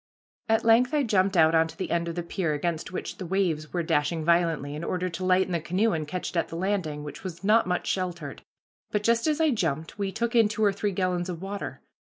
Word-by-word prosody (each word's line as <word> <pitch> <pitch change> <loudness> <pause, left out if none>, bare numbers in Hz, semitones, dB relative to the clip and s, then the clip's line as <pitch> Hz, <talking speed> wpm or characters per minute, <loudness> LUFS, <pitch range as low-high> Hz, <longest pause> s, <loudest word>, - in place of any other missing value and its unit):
At 225 0 +3
length 245 +5 +4
I 290 - +3
jumped 195 -4 +2
out 160 0 +5
onto 160 0 +2
the - - -4
end 170 0 0
of 165 - -4
the 175 - -2
pier 170 -2 -1
against 165 +3 -2
which 185 - -5
the 185 - -4
waves 165 -5 0
were 175 -1 -1
dashing 155 +1 0
violently, 165 -4 +2
in 150 +2 -5
order 185 +1 -1
to 165 +2 -6
lighten 185 0 +3
the 170 - +1
canoe 190 +7 +1
and 155 -2 -2
catch 180 +4 -4
it - - -4
at 165 - +1
the - - -8
landing, 170 -5 -2
which 150 - -8
was 180 -1 -7
not 215 0 +4
much 180 -1 -1
sheltered, 175 -6 -3 0.5
but 210 -1 -1
just 230 +4 +2
as 305 0 +1
I 320 -2 +3
jumped 160 - -2
we 195 -1 -1
took 235 +3 -2
in 225 -2 +6
two 220 0 -1
or 200 - +3
three 200 +1 -1
gallons 185 -1 -1
of 170 -2 -4
water. 195 +2 -6
180 Hz, 245 wpm, -27 LUFS, 165-205 Hz, 0.5 s, in